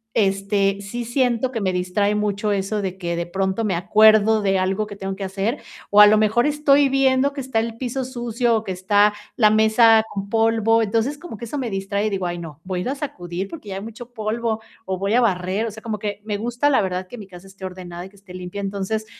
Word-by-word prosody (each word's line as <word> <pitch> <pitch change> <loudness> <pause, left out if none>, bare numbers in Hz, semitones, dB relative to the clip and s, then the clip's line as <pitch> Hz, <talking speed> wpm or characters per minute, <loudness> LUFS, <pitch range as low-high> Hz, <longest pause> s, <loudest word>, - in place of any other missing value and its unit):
este, 195 -1 +1
sí 235 +4 -5
siento 250 0 0
que 230 -4 -3
me 185 -2 +1
distrae 185 +3 0
mucho 210 0 -1
eso 200 +1 -1
de 190 -1 -4
que 170 -2 -3
de 170 0 -3
pronto 190 +4 -1
me 195 -4 0
acuerdo 215 +4 +5
de 195 -1 +1
algo 190 +3 0
que 205 - -9
tengo 195 -1 -5
que 195 - -6
hacer, 195 +7 -2 0.3
o 205 +1 +8
a 210 - +10
lo 215 +1 +5
mejor 220 +4 +2
estoy 290 -1 +3
viendo 270 +1 +3
que 280 - -5
está 260 -3 -1
el 225 0 -3
piso 260 +1 -3
sucio 240 -2 -1
o 220 - -4
que 190 - -5
está 205 +3 +3 0.2
la 215 -3 +4
mesa 220 +1 +5
con 200 0 -5
polvo. 225 0 +3
Entonces, 225 +6 0
como 345 -11 -9
que 235 - -7
eso 280 +5 -4
me 245 -4 -2
distrae 195 +2 -2
y - - 0
digo: 195 -3 -2
"Ay, 175 0 -3
no, 160 -3 -9
voy 185 -1 -3
a - - -2
ir 215 - -3
a 275 - -2
sacudir 185 - -5
porque 225 -8 -10
ya 190 - -4
hay 195 - -5
mucho 230 +2 -10
polvo 220 0 -2 0.2
o 190 -1 -2
voy 200 +3 -1
a 245 - +4
barrer". 190 0 0
O - - -5
sea, 220 +1 -12
como 215 -3 -4
que 205 -1 -4
me 210 -1 -2
gusta 240 +6 0
la 270 - +4
verdad 185 -1 -3
que 240 +4 -10
mi 200 - -10
casa 180 0 -13
esté 195 0 -15
ordenada 180 -1 -7
y - - -16
que 200 - -24
esté 200 -2 -15
limpia. 185 +2 -6
Entonces, 200 +2 -3
210 Hz, 250 wpm, -22 LUFS, 195-230 Hz, 0.3 s, a